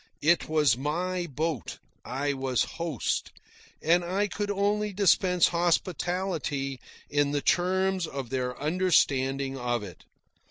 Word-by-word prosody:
It 170 +2 +3
was 150 -6 +4
my 175 +6 -2
boat, 155 -2 -3 0.3
I 140 +3 -2
was 130 -2 0 0.2
host, 160 -8 -2 0.5
and 175 +3 +4
I 190 +4 0
could 205 0 -3
only 205 +1 0
dispense 185 -2 +4
hospitality 170 -5 -1 0.3
in 145 0 +1
the 145 - 0
terms 185 0 +1
of 135 -5 -6
their 125 -1 -2
understanding 140 -5 +1
of 120 -2 -1
it. 90 -4 -11
160 Hz, 120 wpm, -28 LUFS, 135-185 Hz, 0.5 s, was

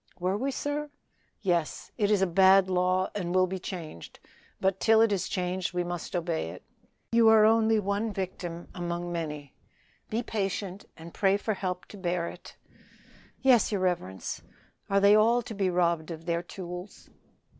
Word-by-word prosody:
"Were 185 +2 0
we, 265 +7 -1
sir?" 290 +2 -3 0.5
"Yes. 175 -6 -1
It 205 -3 +1
is 205 -2 +3
a - - +5
bad 190 +2 +5
law, 185 0 +1
and 180 -3 -3
will 185 0 +5
be 190 +1 -4
changed; 165 - -8 0.4
but 190 0 +1
till 225 -1 +4
it 225 -1 +4
is 195 -3 -1
changed 180 0 -2
we 180 - +1
must 175 0 -5
obey 165 - -1
it. 90 - -10 0.5
You 230 -1 +6
are 220 -1 +7
only 225 0 +4
one 205 +2 -1
victim 180 -3 -5
among 175 0 -4
many. 150 -5 -5 0.6
Be 230 +3 -1
patient, 195 -2 -3
and 165 +1 -11
pray 195 0 +2
for 215 +1 -2
help 185 -2 -4
to 205 - -10
bear 175 -2 -1
it." - - -12 0.9
"Yes, 255 -5 +5
your 200 -3 -1
reverence. 130 - -2 0.5
Are 200 - +3
they 200 +1 +6
all 230 +3 +4
to 225 - -7
be 195 -2 0
robbed 170 -2 +1
of 165 -1 -7
their 170 -1 0
tools?" 180 +1 -9
185 Hz, 170 wpm, -28 LUFS, 175-210 Hz, 0.9 s, are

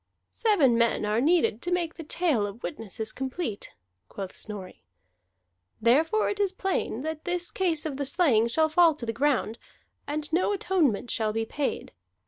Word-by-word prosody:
"Seven 290 - +3
men 235 -2 +2
are 210 +2 +1
needed 305 -7 +2
to 355 - -3
make 345 -2 0
the 330 - -9
tale 300 -9 +1
of 200 +3 -9
the - - -30
witnesses 220 - -5
complete," 265 - -4 0.4
quoth 195 -2 -7
Snorri. 205 -4 -7 1.0
"Therefore 310 - +3
it 405 - -2
is 400 -2 +2
plain 380 - -2
that 315 0 -4
this 355 0 -1
case 340 -5 0
of 290 -4 -3
the 280 - -2
slaying 265 -7 +3
shall 315 +7 +2
fall 325 0 +5
to 255 - -6
the 225 - -2
ground, 260 -5 0 0.5
and 300 +1 -4
no 370 +4 +2
atonement 345 - +1
shall 220 -1 0
be 225 0 -1
paid. 285 +4 -3
295 Hz, 170 wpm, -27 LUFS, 230-345 Hz, 1.0 s, fall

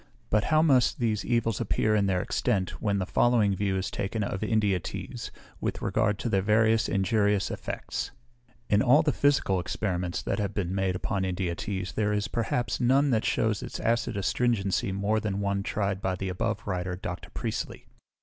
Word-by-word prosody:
But 105 0 +3
how 155 0 +4
must 130 -6 +4
these 110 -4 0
evils 115 -3 0
appear 110 0 +1
in 105 -2 +2
their 90 -2 +1
extent, 95 -3 -1
when 100 -2 +1
the 95 - -1
following 110 -2 +3
view 95 0 0
is 95 - -2
taken 105 +2 -2
of 100 -1 -3
India 105 -4 +2
teas, - - -6 0.3
with - - -2
regard 105 -1 +1
to - - -3
their 100 -4 +2
variety 110 +2 +4
of 115 - +1
injurious 100 +1 +2
EFFECTS. - - -4 0.6
In 105 0 +3
all 145 +7 +5
the 155 - +2
physical 140 -11 +2
experiments 90 -1 -2
that - - -1
have 100 -1 -2
been 95 -3 -1
made 95 -1 0
upon 95 +1 -1
India 90 -1 -1
teas, 95 +1 -4
there 105 -1 0
is, 105 0 0
perhaps, 120 +1 -1
none 135 +3 +4
that 110 -2 +1
shews 110 -3 +1
its - - -6
acid 115 -2 0
astringency 100 -2 0
more 100 +3 0
than 105 -2 -2
one 100 -1 0
tried 100 -1 -2
by 95 -1 0
the 95 +1 -4
above 90 -1 -2
writer, 90 0 -2
Dr. 90 -1 -6
Priestley. - - -4
100 Hz, 190 wpm, -28 LUFS, 95-110 Hz, 0.6 s, all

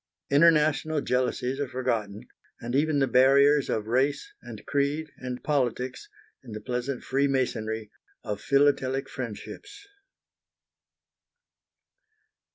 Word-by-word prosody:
International 155 0 +4
jealousies 125 0 -1
are 145 - -1
forgotten, 120 -4 -3 0.3
and 120 +1 -6
even 150 +2 +2
the 140 - +3
barriers 140 +3 +4
of 105 - -1
race, 135 - 0
and - - -10
creed, 145 +2 -1
and 125 -1 -6
politics, 130 - -1 0.3
in 115 - -10
the 110 - -5
pleasant 125 +3 -4
freemasonry 125 -6 -1 0.3
of 105 -1 -4
philatelic 140 -1 +2
friendships. 125 - -8
130 Hz, 100 wpm, -27 LUFS, 125-145 Hz, 0.3 s, International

